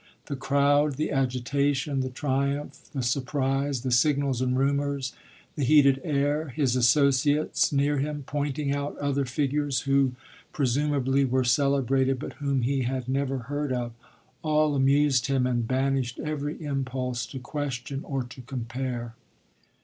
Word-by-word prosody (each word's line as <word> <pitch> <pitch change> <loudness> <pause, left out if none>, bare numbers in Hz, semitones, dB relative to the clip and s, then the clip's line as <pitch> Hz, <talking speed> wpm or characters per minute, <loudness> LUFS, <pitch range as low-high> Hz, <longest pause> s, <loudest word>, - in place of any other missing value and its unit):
The 140 - -4
crowd, 140 +2 +2
the 150 - -2
agitation, 135 +1 0
the 130 0 -1
triumph, 140 +2 -2
the 135 -4 -3
surprise, 135 +1 0
the 130 0 -2
signals 135 0 +2
and 130 0 +1
rumours, 140 -2 0 0.4
the 145 - -1
heated 140 -1 +5
air, 145 0 0
his 135 -2 0
associates, 140 +3 +3
near 145 0 +1
him, 145 +1 -3
pointing 145 0 -2
out 145 0 -3
other 140 -1 0
figures 140 +1 0
who 135 -2 +2 0.4
presumably 140 0 +1
were 130 0 +1
celebrated 135 +1 +2
but 135 - -6
whom 140 -3 0
he 135 +2 +1
had 130 0 -2
never 135 0 0
heard 145 +1 -2
of, 120 -2 -2 0.5
all 155 -1 +2
amused 135 -1 +3
him 135 -2 +1
and 120 -2 0
banished 130 -1 0
every 150 0 -3
impulse 130 -3 -2
to 135 - -8
question 135 -1 -4
or 135 -2 -2
to 125 +1 -11
compare. 120 -1 -4
135 Hz, 140 wpm, -27 LUFS, 130-145 Hz, 0.5 s, heated